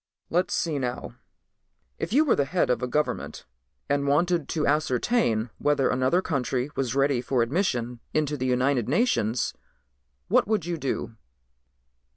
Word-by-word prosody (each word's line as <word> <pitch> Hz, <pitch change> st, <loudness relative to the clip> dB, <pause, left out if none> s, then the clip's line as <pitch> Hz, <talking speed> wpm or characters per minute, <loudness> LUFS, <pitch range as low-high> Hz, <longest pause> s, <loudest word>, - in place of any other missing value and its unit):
"Let's 180 Hz, +2 st, +1 dB
see 160 Hz, -4 st, -1 dB
now. 125 Hz, -2 st, -4 dB, 0.9 s
If -, -, -3 dB
you 295 Hz, +7 st, +4 dB
were 275 Hz, -, +3 dB
the 140 Hz, -, +1 dB
head 170 Hz, -1 st, +1 dB
of 125 Hz, -, 0 dB
a 125 Hz, -, -1 dB
government 150 Hz, +4 st, -2 dB, 0.4 s
and 140 Hz, 0 st, 0 dB
wanted 170 Hz, +2 st, +1 dB
to 155 Hz, -3 st, 0 dB
ascertain 130 Hz, -, +1 dB
whether 145 Hz, -3 st, +2 dB
another 130 Hz, +9 st, +2 dB
country 135 Hz, -2 st, -1 dB
was 130 Hz, -2 st, -1 dB
ready 135 Hz, -2 st, +2 dB
for 125 Hz, -1 st, +1 dB
admission 125 Hz, -, -1 dB
into 150 Hz, -1 st, 0 dB
the 130 Hz, -2 st, -2 dB
United 125 Hz, -1 st, +1 dB
Nations, 130 Hz, -, +1 dB, 0.7 s
what -, -, +3 dB
would 210 Hz, -6 st, 0 dB
you 175 Hz, -1 st, -2 dB
do?" 130 Hz, -5 st, -3 dB
140 Hz, 150 wpm, -26 LUFS, 125-165 Hz, 0.9 s, you